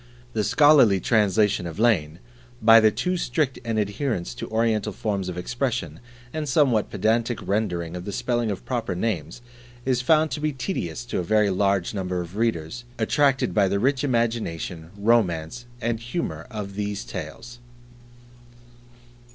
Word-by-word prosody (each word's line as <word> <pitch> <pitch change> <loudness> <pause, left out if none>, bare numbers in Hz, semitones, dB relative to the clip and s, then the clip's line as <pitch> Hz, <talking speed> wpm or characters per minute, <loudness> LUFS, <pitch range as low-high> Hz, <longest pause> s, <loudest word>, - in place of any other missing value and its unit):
The 110 - 0
scholarly 140 -8 +5
translation 105 -3 +2
of 80 - -7
Lane, 90 -9 +2 0.4
by 115 -1 +8
the 110 -1 +5
too 180 - -1
strict 135 -2 -1
an 115 -2 -2
adherence 100 - -2
to - - -7
Oriental 110 -2 +1
forms 100 -4 -2
of 90 - -6
expression, 125 +6 -3 0.3
and 155 -2 -3
somewhat 125 -6 +3
pedantic 115 +1 0
rendering 90 -5 -1
of 90 0 -6
the 100 - -4
spelling 120 +2 -1
of 100 - -5
proper 120 -7 -2
names, 90 +1 -3 0.4
is 130 -2 +1
found 155 +4 +3
to - - -3
be 150 0 -1
tedious 125 - -4
to 120 - -2
a - - -1
very 105 +2 +2
large 100 -1 +1
number 90 -3 -2
of 90 +2 -6
readers 115 0 -1
attracted 135 +4 +2
by 100 -2 +3
the 100 +1 0
rich 130 +6 +1
imagination, 110 - -1
romance, 100 -2 +1 0.2
and 115 0 -1
humour 120 +9 -4
of 105 -4 -6
these 105 0 -3
tales. 100 +8 -8
110 Hz, 150 wpm, -24 LUFS, 95-120 Hz, 0.4 s, by